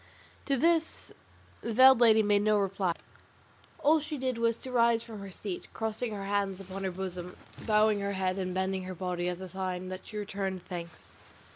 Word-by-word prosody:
To 275 -1 +2
this 325 +3 +1 0.5
the 230 - -3
veiled 260 +1 +8
lady 220 -2 +6
made 205 -1 +3
no 215 0 +3
reply; 195 -3 0 0.8
all 315 +2 +4
she 300 0 -5
did 255 -3 -2
was 230 0 +1
to 260 - -6
rise 235 -2 +3
from 220 -3 -9
her 200 0 -7
seat, 190 -1 -6
crossing 225 +1 -2
her 200 -2 -5
hands 200 -1 -1
upon 195 0 -7
her - - +1
bosom, 180 -1 -6 0.3
bowing 215 -1 +4
her 200 0 -2
head 190 0 -1
and 185 -1 -2
bending 190 0 -1
her 185 0 -6
body 180 0 -2
as 180 +1 -5
a 190 - -5
sign 185 0 -4
that 185 0 -7
she 215 - -7
returned 195 -3 -3
thanks. 170 -3 -8
200 Hz, 190 wpm, -30 LUFS, 185-225 Hz, 0.8 s, veiled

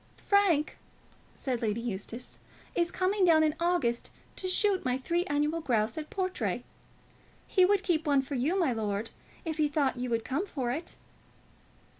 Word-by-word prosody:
"Frank," 380 -7 +3 0.6
said 255 -3 -2
Lady 220 -1 0
Eustace, 230 +1 -5 0.3
"is 340 -1 +1
coming 380 +2 +1
down 325 -3 +6
in 305 -1 +2
August 335 -9 +1 0.3
to 375 - -3
shoot 380 +1 +2
my 255 0 +1
three 340 +7 0
annual 300 0 0
grouse 225 -5 +1
at 310 -1 -5
Portray. 370 -1 -2 0.8
He 370 -2 +4
would 400 0 +3
keep 325 -4 0
one 280 -2 +4
for 275 - -7
you, 280 +9 +1
my 310 -9 +2
lord, 215 -1 -2 0.3
if 320 -1 -3
he 305 -1 +3
thought 285 -3 0
you 250 0 -3
would 230 -1 -1
come 315 +10 -1
for 255 -8 -2
it." 315 +7 -5
300 Hz, 165 wpm, -30 LUFS, 250-355 Hz, 0.8 s, down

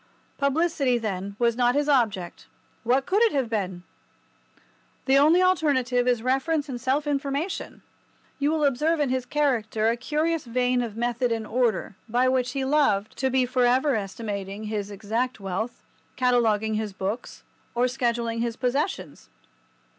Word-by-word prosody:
Publicity, 280 -3 +1
then, 200 -3 -4
was 235 -1 +2
not 245 +1 +2
his 290 0 +1
object. 220 - 0 0.3
What 255 +4 +1
could 400 +4 +1
it 460 -2 +4
have 260 -5 -1
been? 185 -5 -2 1.2
The 270 +1 +5
only 325 +6 +5
alternative 260 -9 +2
is 240 -2 +1
reference 280 +4 0
and 245 -3 -6
self 275 +4 0
information. 285 +4 -3 0.6
You 285 +1 +2
will 310 -1 +1
observe 300 +5 +1
in 290 -3 +1
his 255 -1 -1
character 230 -7 +1
a 230 - +1
curious 305 +5 -1
vein 250 +1 +1
of 225 -3 -5
method 240 +1 0
and 225 -1 -2
order, 230 -5 0
by 245 +3 +2
which 255 -1 +1
he 270 -1 -1
loved, 265 -8 +1
to 265 - +1
be 260 0 +2
for 250 0 +1
ever 260 +4 +3
estimating 200 -1 -4
his 210 -2 -3
exact 220 +5 -2
wealth, 195 +5 -4 0.3
cataloguing 225 -4 +2
his 215 -2 -2
books, 195 +5 -5 0.3
or 245 +1 +3
scheduling 235 -2 -1
his 235 -1 -2
possessions. 275 +9 -2
250 Hz, 155 wpm, -25 LUFS, 220-280 Hz, 1.2 s, The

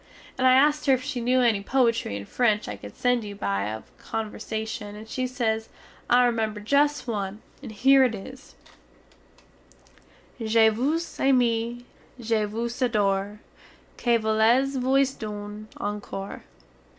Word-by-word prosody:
And 260 0 +2
I 255 - +7
askt 295 +3 +3
her 270 - +6
if 255 - -6
she 285 -4 -3
new 250 +2 +2
enny 225 -5 +3
poitry 230 - +1
in 100 0 -6
french 215 - +1
I 105 - -4
cood 100 0 -11
send 245 -2 +1
you 205 -1 -7
by 100 - -1
way 105 - -3
of 110 - -10
conversashun, 220 -1 -5
and 215 +1 -10
she 255 +3 -2
sez, 225 -3 -2 0.4
I 245 +1 +5
remember 220 -3 -1
just 285 +5 +1
one, 210 -2 -4 0.2
and 255 -5 -8
here 265 +5 +5
it 245 -3 +1
is, 260 +7 -11 1.8
_"Je 225 0 +4
vous 285 +10 -2
aime, 240 -2 +1 0.3
je 225 -2 0
vous 235 +4 -4
adore, 205 -3 0 0.5
Que 240 -1 +2
voulez 225 +5 +2
vous 265 +2 +3
done 210 -1 -7
encore?" 205 -1 -5
230 Hz, 145 wpm, -25 LUFS, 210-255 Hz, 1.8 s, I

